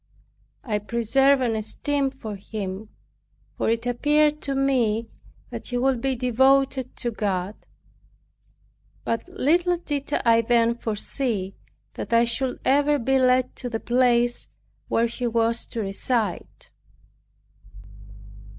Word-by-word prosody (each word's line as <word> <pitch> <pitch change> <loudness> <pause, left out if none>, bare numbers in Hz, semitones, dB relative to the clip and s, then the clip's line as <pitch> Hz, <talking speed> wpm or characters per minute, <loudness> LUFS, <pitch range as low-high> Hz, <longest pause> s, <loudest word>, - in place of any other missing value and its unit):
I 215 -6 -1
preserved 260 +5 +2
an 230 -3 0
esteem 275 +6 -1
for 225 -6 -7
him; 200 0 -6 0.7
for - - -1
it 230 +1 0
appeared 295 +5 +2
to 275 -1 -2
me 235 -5 +1 0.4
that - - -6
he 245 - -2
would 255 -1 +1
be 270 0 0
devoted 265 +1 +2
to 240 - -3
God; 200 -3 -2 1.5
but 230 -1 -2
little 350 +5 +2
did 290 -4 -4
I 230 0 +5
then 235 0 +3
foresee, 220 -3 -3 0.4
that - - -5
I 230 +1 +5
should 250 +2 -2
ever 290 +2 +3
be 265 +1 +1
led 255 0 +2
to 250 - -4
the 225 -2 -3
place 240 0 +2 0.4
where 230 - +2
he 240 +1 -3
was 230 0 0
to 230 - -4
reside. 205 0 -2
240 Hz, 125 wpm, -24 LUFS, 225-270 Hz, 1.5 s, I